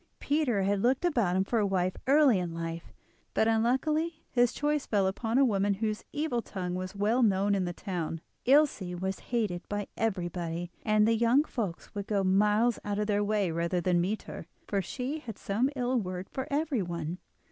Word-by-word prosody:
Peter 275 -9 +1
had 200 0 +1
looked 255 +8 +2
about 235 - +2
him 190 - +3
for 230 +4 0
a 210 - +2
wife 185 -1 0
early 275 -6 +5
in 170 -2 -4
life, 165 0 -5 0.4
but 220 - +3
unluckily 300 +9 +1
his 245 -1 +3
choice 295 -1 -1
fell 200 -3 +2
upon 225 +5 -1
a 275 - +6
woman 200 -3 +1
whose 215 +1 -2
evil 290 -5 -1
tongue 180 -5 -4
was 185 +2 -4
well 215 +5 +2
known 200 -2 +3
in 195 -2 +1
the 175 - -2
town. 175 -3 -4 0.3
Ilse 285 -2 +4 0.2
was 190 +1 -2
hated 215 -8 -2
by 205 0 -2
everybody, 175 -5 -2
and 215 -1 +3
the 230 - +4
young 235 +5 +4
folks 210 - -5
would 200 -2 -5
go 200 -2 +1
miles 210 +5 +3
out 205 -1 -2
of 210 - 0
their 205 -1 +1
way 205 -4 +1
rather 170 +2 0
than 175 0 +2
meet 200 +5 -2
her, 165 - -8 0.2
for 200 -1 0
she 255 - -4
had 230 -8 -8
some 225 +7 0
ill 250 -1 +1
word 185 -2 -5
for 265 +1 -4
everyone. 185 - -2
205 Hz, 190 wpm, -29 LUFS, 185-245 Hz, 0.4 s, a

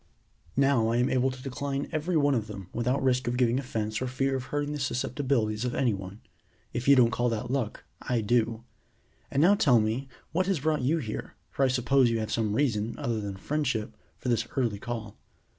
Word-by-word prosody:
Now 135 -5 +4
I 115 +1 +1
am 125 +2 +2
able 130 0 +2
to 130 0 -8
decline 140 +1 -3
every 160 +2 0
one 145 -1 +3
of 110 -4 -1
them 95 -3 -8
without 125 +3 0
risk 130 -1 +2
of 120 +1 0
giving 125 0 +3
offense 110 -4 -3
or 130 - -1
fear 135 +2 0
of 130 -1 -3
hurting 145 +1 -2
the 150 - -4
susceptibilities 125 -4 0
of 125 - -2
any 125 -5 +2
one. 95 +2 -7 0.5
If 120 +2 -3
you 140 - +8
don't 120 -3 +5
call 120 +2 +1
that 115 +1 -3
luck, 130 -6 -2 0.2
I 120 -2 0
do. 115 +1 +1 0.7
And 140 - +2
now 190 +4 +7
tell 130 - +5
me 110 +5 -1 0.2
what 185 +3 +1
has 190 -7 0
brought 155 -1 +1
you 145 +7 +2
here, 110 -9 -5 0.2
for 140 - 0
I - - +5
suppose 130 0 +3
you 115 - +1
have 110 - -3
some 110 -2 0
reason, 115 -5 0
other 115 -2 -1
than 100 -2 -4
friendship, 130 -2 -2 0.2
for - - -7
this 115 -1 +1
early 115 -6 +1
call. 115 -3 -6
125 Hz, 210 wpm, -28 LUFS, 115-140 Hz, 0.7 s, you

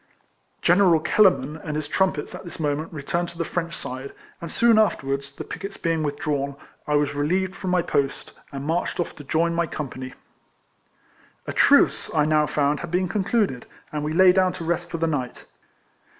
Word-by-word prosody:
General 175 -2 +5
Kellerman 160 -4 +3
and 155 -1 -5
his 155 -1 -3
trumpets 185 -2 0
at - - -8
this 175 -3 -9
moment 150 +1 -1
returned 170 +3 -2
to 170 - -12
the 165 - -1
French 170 0 -3
side; 130 +2 -7 0.3
and 170 - -5
soon 230 +2 +4
afterwards, 140 -9 0
the - - -6
picquets 195 0 -7
being 165 -1 0
with 145 -1 -2
drawn, 140 -2 -2 0.3
I 150 - +1
was 145 -1 +1
relieved 180 +6 0
from 190 - -4
my 180 -1 +2
post, 140 -3 -1 0.2
and 140 -1 -6
marched 165 +4 -1
off 175 - -2
to 145 - -9
join 165 +4 +1
my 170 0 0
company. 130 -4 -6 1.3
A - - -4
truce, - - +4
I 150 -1 +4
now 155 -1 +3
found, 145 0 +1
had 170 - -6
been 180 +2 +1
concluded, 200 - 0 0.2
and 150 -1 -3
we 150 - -2
lay 185 +2 +7
down 185 -1 +2
to 180 -3 -6
rest 170 +1 -1
for 165 - -4
the 165 - 0
night. 140 -6 -3
160 Hz, 190 wpm, -24 LUFS, 145-175 Hz, 1.3 s, lay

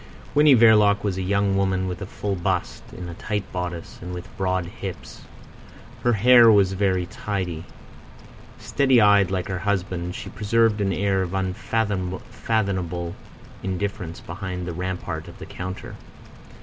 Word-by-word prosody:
Winnie 150 -1 +6
Verloc 105 -3 +5
was 100 -3 -1
a - - -1
young 100 +1 +1
woman 95 -1 +1
with 90 +2 -5
a 95 - -5
full 100 0 -3
bust, 90 0 -2
in 90 - -8
a 85 - -6
tight 105 +3 -3
bodice, 90 -2 -5
and 90 +1 -6
with 90 - -9
broad 95 -2 0
hips. 95 0 -8 0.8
Her 120 - +3
hair 120 +2 +7
was 100 -2 +4
very 95 -2 +1
tidy. 90 -4 -4 0.9
Steady 135 -3 +3
eyed 100 -3 +5
like 95 -2 -2
her 95 -2 -3
husband, 95 -3 -2
she 115 - -7
preserved 110 0 +2
an 95 -1 +1
air 95 +1 +1
of 95 0 -3
unfathomable 95 -2 -2 0.5
indifference 95 -3 -4
behind 90 0 -5
the 85 - -4
rampart 90 +1 -4
of - - -11
the - - -9
counter. 95 +1 -7
95 Hz, 150 wpm, -24 LUFS, 90-105 Hz, 0.9 s, hair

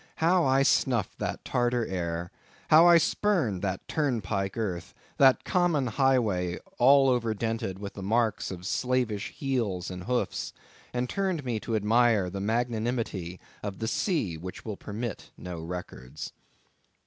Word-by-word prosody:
How 170 +2 +3
I 135 +1 +4
snuffed 125 -6 +1
that - - -4
Tartar 120 -1 +1
air!—how 90 - +1
I 170 -1 +8
spurned 165 - +1
that 95 -2 -3
turnpike 110 - -1
earth!—that 110 +6 +1
common 175 -7 +2
highway 110 -8 +1 0.2
all 135 +2 +6
over 120 -4 +1
dented 110 -3 -2
with 100 0 -7
the 100 - -8
marks 110 +2 0
of 90 -1 -7
slavish 115 -1 0
heels 110 -11 -2
and 90 -1 -7
hoofs; 125 +2 -1 0.4
and 125 0 -1
turned 185 -3 -1
me 120 -3 -1
to 115 - -3
admire 110 -3 +3
the 95 +1 -4
magnanimity 110 -5 -2 0.2
of 100 -2 -5
the 110 - -3
sea 115 - 0
which 90 +3 -8
will 110 -3 -4
permit 105 +2 -6
no 90 -2 -6
records. 80 -7 -7
115 Hz, 135 wpm, -28 LUFS, 95-130 Hz, 0.4 s, I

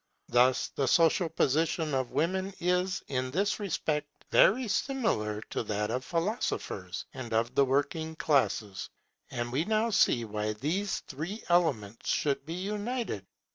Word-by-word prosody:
Thus 125 +1 +4
the 135 - -1
social 165 +4 +4
position 160 +1 +1
of 130 -2 0
women 185 +7 -1
is 180 +1 0
in 130 -1 -1
this 200 +9 0
respect 155 -6 -1 0.2
very 245 +5 +5
similar 190 - 0
to - - -1
that 105 -1 -2
of 130 +2 -1
philosophers 165 - -2
and 130 -3 -7
of 115 +2 +1
the 140 +1 +4
working 145 +4 0
classes. 130 -10 0 0.4
And 120 0 -3
we 135 +5 +1
now 220 +3 +1
see 120 - +3
why 105 0 -2
these 170 - -1
three 165 +11 -6
elements 120 - +1
should 140 -1 0
be 165 - -4
united. 205 - -3
150 Hz, 140 wpm, -30 LUFS, 120-185 Hz, 0.4 s, very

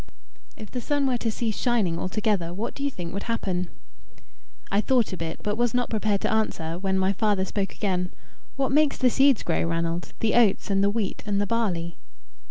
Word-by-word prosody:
"If 215 - -9
the 250 - -3
sun 285 +2 0
were 250 -2 +1
to 230 - 0
cease 220 -1 -2
shining 210 -9 +1
altogether, 185 -3 -1
what 215 +5 -3
do - - -9
you 280 - +2
think 175 -9 -6
would 200 +4 -5
happen?" 185 -6 -1 1.0
I 200 - +3
thought 245 -4 +2
a - - -1
bit, 165 -1 -5
but 210 +1 -1
was 240 0 +1
not 245 -1 0
prepared 215 -2 +1
to - - 0
answer, 170 -6 -1
when 190 0 0
my 190 +1 +2
father 205 -2 +1
spoke 195 0 -3
again. 180 -3 -1 0.4
"What 270 -1 0
makes 300 0 +3
the 250 -1 +3
seeds 270 -2 +4
grow, 165 - 0
Ranald 170 +1 -2
the 225 - +1
oats, 220 -4 +3
and 195 0 +3
the 200 - +4
wheat, 205 -2 -2
and 200 -1 +1
the 205 - +1
barley?" 185 -7 -1
205 Hz, 205 wpm, -26 LUFS, 185-235 Hz, 1.0 s, seeds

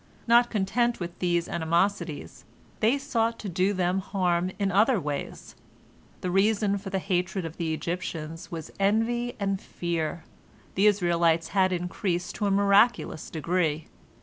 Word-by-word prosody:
Not 240 +1 +5
content 235 +4 0
with 175 -1 -6
these 175 -1 +1
animosities, 170 +5 -1 0.4
they 230 +5 +3
sought 230 -5 -1
to 210 - -7
do 185 +2 +1
them 185 -1 0
harm 185 -2 0
in, 200 -1 0
other 215 +4 +4
ways. 145 -3 -5 0.7
The 180 - -2
reason 200 +1 +2
for 195 - -7
the 190 - -1
hatred 185 0 -1
of 165 0 -7
the 165 -2 -2
Egyptians 165 -1 -4
was 165 -3 -7
envy 230 +4 +1
and 195 -1 -1
fear. 170 -1 -3 0.5
The 200 +2 +4
Israelites 170 -4 +2
had 190 -2 +2
increased 180 0 -2
to 210 - 0
a - - +2
miraculous 200 -2 +3
degree. 160 -1 -1
185 Hz, 145 wpm, -27 LUFS, 170-205 Hz, 0.7 s, Not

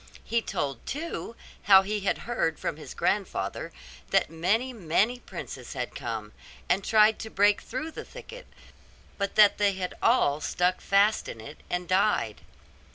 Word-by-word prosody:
He 235 0 0
told, 135 - -3
too, 300 -5 -5 0.3
how 195 -1 +8
he 210 +2 -2
had 195 - 0
heard 230 -9 0
from - - -3
his - - -10
grandfather - - -1 0.4
that - - +2
many, 210 +11 0
many 215 +5 +1
princes 135 - -8
had 125 -2 -4
come, 110 -3 -5 0.4
and 180 - +3
had - - -5
tried 215 0 +5
to 220 - -6
break 205 0 +3
through 265 +7 -5
the - - -7
thicket, - - -11 0.7
but 200 0 -2
that 210 -1 +6
they 205 -1 +3
had 185 -1 -4
all 155 - +3
stuck 180 +4 0
fast 200 +2 +3
in 115 - -8
it, 145 +8 -10
and 180 0 -2
died. 185 - +1
200 Hz, 160 wpm, -27 LUFS, 165-225 Hz, 0.7 s, how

